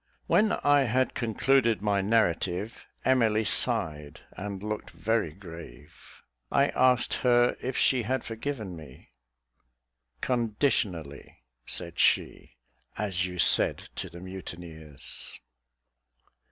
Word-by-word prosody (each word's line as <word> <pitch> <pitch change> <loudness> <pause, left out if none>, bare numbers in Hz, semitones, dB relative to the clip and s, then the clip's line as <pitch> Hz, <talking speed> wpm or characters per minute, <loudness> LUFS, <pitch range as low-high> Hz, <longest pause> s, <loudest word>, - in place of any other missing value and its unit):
When 215 0 +3
I 145 -1 +4
had 130 +2 +1
concluded 120 -1 +1
my 100 -2 +1
narrative, 100 -1 0 0.2
Emily 110 -4 +3
sighed 80 - 0
and 100 0 -7
looked 105 0 -4
very 110 -7 -1
grave. 80 -4 -13 0.3
I 140 +1 +3
asked 125 -1 +3
her 120 -1 +4
if 130 +1 -3
she 130 -2 +3
had 130 +3 -2
forgiven 115 -4 -5
me. 75 -5 -13 1.1
"Conditionally," 105 - -2 0.2
said 85 -2 -3
she, - - +1 0.4
"as 95 -3 -1
you 90 0 -8
said 85 - +4
to - - -4
the 85 +1 -11
mutineers." 85 -5 -8
105 Hz, 105 wpm, -28 LUFS, 85-120 Hz, 1.1 s, I